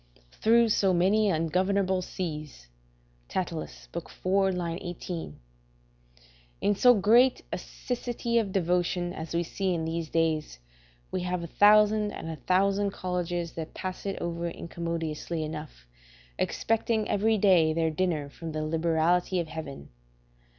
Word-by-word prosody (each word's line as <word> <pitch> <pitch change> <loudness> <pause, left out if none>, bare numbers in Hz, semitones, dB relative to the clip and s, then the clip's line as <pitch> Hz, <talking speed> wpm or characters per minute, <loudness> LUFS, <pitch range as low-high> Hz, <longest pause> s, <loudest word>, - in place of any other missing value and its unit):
["Through 230 - +4
so 195 -3 +3
many 200 +4 +3
ungovernable 185 +3 +1
seas." 150 - -6 0.6
Catullus, 175 -4 -4
iv. 170 - -2 0.5
18.] 170 - -5 1.2
In 205 - +2
so 245 +4 +6
great 235 +6 +4
a - - 0
siccity 240 -1 -2
of 200 -3 -5
devotion 175 -1 0
as 160 -1 -6
we 170 - +2
see 185 +1 -1
in 160 -1 -2
these 165 0 -3
days, 160 - 0 0.5
we 185 - -1
have 180 -1 -2
a 170 - -9
thousand 210 0 +5
and 165 - -6
a - - -4
thousand 195 +4 +2
colleges 175 -3 -3
that 160 -1 -7
pass 185 +1 -5
it 195 - -3
over 170 0 -3 0.2
commodiously 165 -1 -3
enough, 155 - -7 0.5
expecting 225 -1 0
every 220 +2 +2
day 185 -6 +5
their 160 0 +1
dinner 155 -3 -1
from 160 +2 -8
the 155 0 -2
liberality 165 +3 +1
of 165 -2 -3
Heaven. 150 - -7
175 Hz, 130 wpm, -28 LUFS, 160-200 Hz, 1.2 s, so